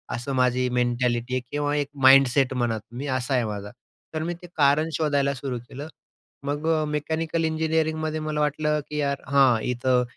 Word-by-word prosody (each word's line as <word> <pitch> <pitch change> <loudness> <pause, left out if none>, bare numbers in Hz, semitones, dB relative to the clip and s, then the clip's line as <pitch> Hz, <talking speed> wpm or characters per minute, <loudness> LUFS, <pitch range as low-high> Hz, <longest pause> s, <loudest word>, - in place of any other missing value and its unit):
असं 130 +3 -4
माझी 125 0 +2
मेंटॅलिटी 120 0 0
आहे 130 - 0
किंवा 145 0 -1
एक 145 -1 -1
माइंडसेट 135 0 +6
म्हणा 120 -3 0
तुम्ही 120 +7 -8
असा 130 0 -1
आहे 125 -2 +2
माझा. 105 -1 -5 0.4
तर 155 0 -2
मी 175 +1 -2
ते 175 - -10
कारण 150 +2 +3
शोधायला 140 -3 +1
सुरू 125 -2 -4
केलं. 140 +3 -7 0.6
मग 145 +3 -2
अ, 155 -1 +2
मेकॅनिकल 160 +2 -2
इंजिनिअरिंगमध्ये 160 0 0
मला 155 -1 -3
वाटलं, 150 +1 0
की 150 - -4
"यार, 140 -1 -1
हां, 130 -5 +4
इथं 125 0 +1
140 Hz, 170 wpm, -25 LUFS, 125-155 Hz, 0.6 s, माइंडसेट